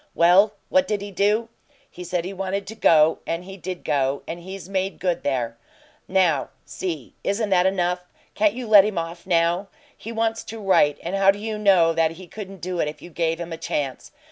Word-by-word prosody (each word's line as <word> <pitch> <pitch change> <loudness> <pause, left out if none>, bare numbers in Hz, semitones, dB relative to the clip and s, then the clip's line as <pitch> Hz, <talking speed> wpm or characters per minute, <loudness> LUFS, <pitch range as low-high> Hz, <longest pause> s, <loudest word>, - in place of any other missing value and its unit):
Well, 185 +5 +5 0.2
what 280 0 +3
did 210 -2 -1
he 205 - -7
do? 210 +4 +1 0.4
He 180 - -10
said 175 -1 -2
he 190 - -5
wanted 195 +1 -3
to 205 - -7
go. 160 -7 +4
And 165 +1 -2
he 190 +1 -9
did 185 -1 -6
go, 140 -1 0
and 170 - -5
he's 190 +1 -9
made 195 0 -2
good 180 -2 -1
there. 120 -4 -2 0.5
Now, 180 -7 +2 0.2
see: 160 -9 -5
Isn't 205 +1 -1
that 185 0 +4
enough? 180 -1 0 0.3
Can't 210 0 +2
you 250 -1 -5
let 210 -2 +8
him 210 -2 -2
off 170 +2 -5
now? 170 +2 +2 0.3
He 225 - -8
wants 225 0 -1
to 225 - -7
write, 165 -8 +3
and 175 +3 -3
how 195 0 +4
do 195 - +4
you 215 +1 -4
know 185 -5 +4
that 165 0 +1
he 185 +3 -11
couldn't 195 +1 -9
do 180 0 -3
it - - +1
if 150 0 -7
you 175 - -11
gave 165 0 -1
him 170 -1 -5
a - - -5
chance? 140 -4 -4
185 Hz, 215 wpm, -23 LUFS, 165-200 Hz, 0.5 s, let